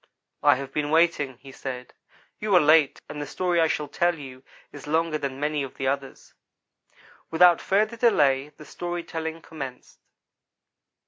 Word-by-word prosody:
"I 145 -1 +5
have 135 +1 -7
been 150 -1 -1
waiting," 160 -5 +2
he 135 - -11
said. 125 -1 -7 0.5
"You 210 -2 +1
are - - +8
late 155 -2 +4
and 150 - -6
the 145 - -5
story 175 +2 0
I 160 - +4
shall 150 -1 -2
tell 175 +3 0
you 130 -3 -10 0.3
is 145 0 -11
longer 160 0 0
than 135 -2 -4
many 150 0 -1
of 135 -2 -6
the 135 - -3
others." 135 0 -4 1.0
Without 175 +1 +5
further 215 +4 +1
delay 145 - +3
the 150 - -15
story 175 +1 -5
telling 160 0 -5
commenced. 135 -5 -9
150 Hz, 160 wpm, -25 LUFS, 135-170 Hz, 1.0 s, are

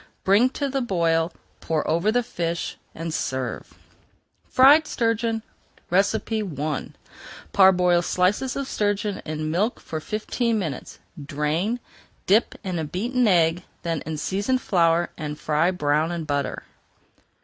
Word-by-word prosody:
Bring 205 +7 +5
to 285 - 0
the 270 0 -1
boil, 170 -6 +1 0.3
pour 160 -2 -1
over 170 +7 +2
the 245 +2 +2
fish, 170 -5 -3 0.2
and 165 0 -4
serve. 130 -5 -3 0.7
FRIED 290 +4 +6
STURGEON 230 -2 0 0.5
I 180 - 0 0.6
Parboil 180 -3 +5
slices 185 +9 +1
of 275 -1 -3
sturgeon 205 -2 -1
in 155 0 -3
milk 205 +8 0
for 160 - -5
fifteen 220 +5 -1
minutes, 160 -10 -5 0.3
drain, 155 - -1 0.5
dip 215 +5 +3
in 180 -5 -2
beaten 240 - 0
egg, 170 -2 +3 0.2
then 165 -3 -2
in 160 -1 -3
seasoned 205 - 0
flour, 170 -2 +2
and 150 -1 -5
fry 155 +3 +2
brown 155 -2 +1
in 170 -1 -3
butter. 145 -2 -2
180 Hz, 125 wpm, -24 LUFS, 160-220 Hz, 0.7 s, FRIED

